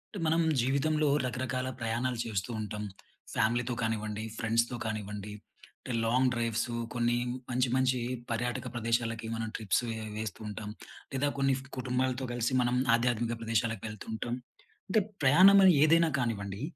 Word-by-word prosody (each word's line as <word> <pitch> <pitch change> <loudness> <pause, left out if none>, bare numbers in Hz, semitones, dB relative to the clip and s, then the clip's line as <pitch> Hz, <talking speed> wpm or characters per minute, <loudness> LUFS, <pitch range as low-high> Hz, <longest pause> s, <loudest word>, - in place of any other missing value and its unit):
టె - - -4
మనం 165 +1 +3 0.2
జీవితంలో 145 +5 +2 0.2
రకరకాల 130 0 -2
ప్రయాణాలు 120 +2 -1
చేస్తూ 105 -2 -3
ఉంటాం. 105 0 -4 0.5
ఫ్యామిలీతో 120 +3 +1
కానివ్వండి, 110 -1 -2
ఫ్రెండ్స్‌తో 115 +2 +1
కానివ్వండి, 105 -1 -4 0.5
అంటే 125 - -6
లాంగ్ 125 +3 +3
డ్రైవ్స్. 115 0 -1 0.2
కొన్ని 120 0 +1 0.3
మంచి 125 0 +1
మంచి 130 -1 +2 0.3
పర్యాటక 120 +2 -2
ప్రదేశాలకి 115 -1 -1
మనం 115 0 -3
ట్రిప్స్ 110 0 +1
వే 115 - -2 0.2
వేస్తూ 110 -5 -4
ఉంటాం. 105 0 -6 0.4
లేదా 140 +2 +1
కొన్ని 135 -1 +3 0.2
కుటుంబాలతో 130 0 -1
కలిసి 120 +1 0
మనం 120 0 +1 0.2
ఆధ్యాత్మిక 120 0 +1
ప్రదేశాలకు 115 -2 -1
వెళ్తూ 105 -1 -8
ఉంటాం. 120 +2 -3 0.5
అంటే 210 +3 +3 0.2
ప్రయాణం 185 +9 +8
అని 185 - +8
ఏదైనా 165 +1 +5
కానివ్వండి. 100 -4 -2
120 Hz, 135 wpm, -30 LUFS, 110-130 Hz, 0.5 s, ప్రయాణం